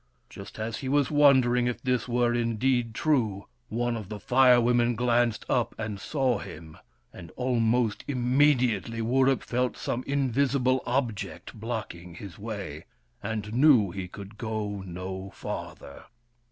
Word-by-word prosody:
Just 100 +2 -10
as 110 +1 -3
he 130 - -5
was 145 0 +2
wondering 130 -4 +4
if 125 - -2
this 125 -3 -1
were 120 0 +1
indeed 120 0 0
true, 110 - 0 0.2
one 120 +2 -1
of 110 -4 -7
the 105 -1 -6
Fire 125 +3 +5
Women 120 0 +2
glanced 120 -1 +1
up 125 -3 0
and 105 -3 -4
saw 130 -2 0
him; 80 -4 -10 0.4
and 85 - -10
almost 120 -3 +1
immediately 125 -4 +2
Wurip 130 +3 +2
felt 125 +1 -1
some 125 - -3
invisible 130 -1 +1
object 120 -5 -3
blocking 105 -6 -6
his 100 0 -10
way, 100 -8 -6 0.4
and 110 -1 -4
knew 125 - +5
he 95 -1 -5
could 100 +3 -11
go 105 -3 -3
no 95 +1 -6
farther. 70 - -7
120 Hz, 140 wpm, -27 LUFS, 105-125 Hz, 0.4 s, Fire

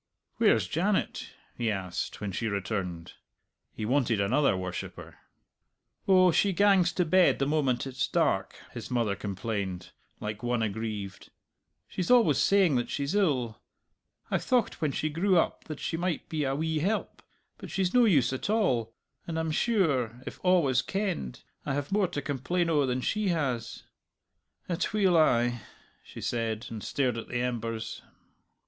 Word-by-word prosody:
"Where's - - +3
Janet?" - - -1 0.3
he 120 -2 -1
asked 95 -4 -4
when 105 -1 -3
she 110 +5 -2
returned. 95 -4 -3 0.6
He 110 - -5
wanted 120 -3 +1
another 115 +2 +2
worshipper. 90 -1 -6 0.9
"Oh, 185 -2 +6
she 195 +4 +2
gangs 195 -3 +4
to 180 - +1
bed 185 +3 +4
the 135 - 0
moment 135 -5 +1
it's 130 -1 -2
dark," - - 0
his - - -7
mother 115 -5 0
complained, 100 -2 -4 0.3
like 105 0 -5
one 120 -1 0
aggrieved. 105 -2 -4 0.6
"She's 180 - -4
always 245 -2 +5
saying 190 -9 +4
that 120 - -2
she's 140 +3 -2
ill. 135 - +1 0.7
I - - +2
thocht 245 -4 0
when 150 -3 +1
she 155 - -1
grew 175 +5 +2
up - - 0
that 155 -2 -7
she 165 - -2
might 175 -1 -2
be 155 -3 -1
a 135 0 0
wee 160 +1 -1
help, 205 +7 -2 0.4
but - - -8
she's 190 -2 -1
no 250 -1 +6
use 140 - +3
at 130 - -4
all. 125 - +1 0.3
And 165 -1 -3
I'm 160 -1 -1
sure, 150 - +1
if - - -9
a' 180 0 +5
was 130 -4 +2
kenned, 190 - -3 0.2
I 135 - -2
have 145 +3 -3
more 200 -1 +2
to 145 - -5
complain 165 +5 -1
o' 145 -4 +2
than 125 0 -1
she 215 - 0
has. 140 - -2 0.8
Atweel 185 +1 +1
ay," 120 -7 +3 0.4
she - - -10
said, 115 -1 -2
and 110 -2 -6
stared 125 -4 0
at - - -8
the 120 -1 -2
embers. 115 -2 -3
135 Hz, 160 wpm, -28 LUFS, 115-175 Hz, 0.9 s, Oh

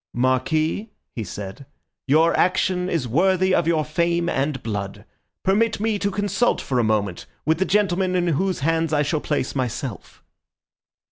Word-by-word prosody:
"Marquis," 155 - +1 0.2
he 115 - -4
said, 100 +7 -8 0.4
"your 160 +4 +4
action 180 0 +1
is 160 -8 -1
worthy 185 - +2
of 170 -2 +2
your 160 -2 +2
fame 170 +2 0
and 135 -3 -1
blood. 100 -3 -4 0.4
Permit 215 +4 +2
me 215 -1 0
to 200 - 0
consult 205 +4 0
for 130 -2 -1
a - - +3
moment 105 -5 -1 0.2
with 160 0 +2
the 190 - +2
gentlemen 190 -2 +1
in 175 -1 +1
whose 185 +3 0
hands 165 +1 +1
I 150 -1 +3
shall 150 +1 -1
place 145 -3 -1
myself." 125 -2 -4
160 Hz, 155 wpm, -22 LUFS, 130-185 Hz, 0.4 s, your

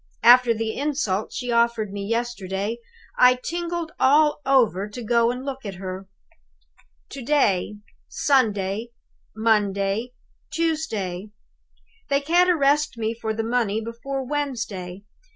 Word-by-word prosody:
After 245 0 +7
the 225 -1 -2
insult 270 -9 -1
she 245 -1 -4
offered 235 -3 +1
me 200 -1 -4
yesterday, 220 -1 -3 0.4
I 250 0 +7
tingled 340 +4 -4
all 295 +3 +4
over 220 -7 +3
to 235 +3 -8
go 235 +1 +3
and 250 +2 -4
look 270 -1 -5
at 200 -3 -6
her. 185 +1 -7 1.0
"To 275 - -8
day; 225 -8 +1 0.3
Sunday; 220 -5 +1 0.5
Monday; 210 +1 0 0.4
Tuesday. 220 - -2 0.8
They 280 0 +3
can't 345 +5 +3
arrest 295 -5 +2
me 225 0 -1
for 225 -1 -4
the 220 +1 -2
money 225 -2 0
before 245 +4 -5
Wednesday. 225 -10 -4
235 Hz, 120 wpm, -23 LUFS, 205-275 Hz, 1.0 s, After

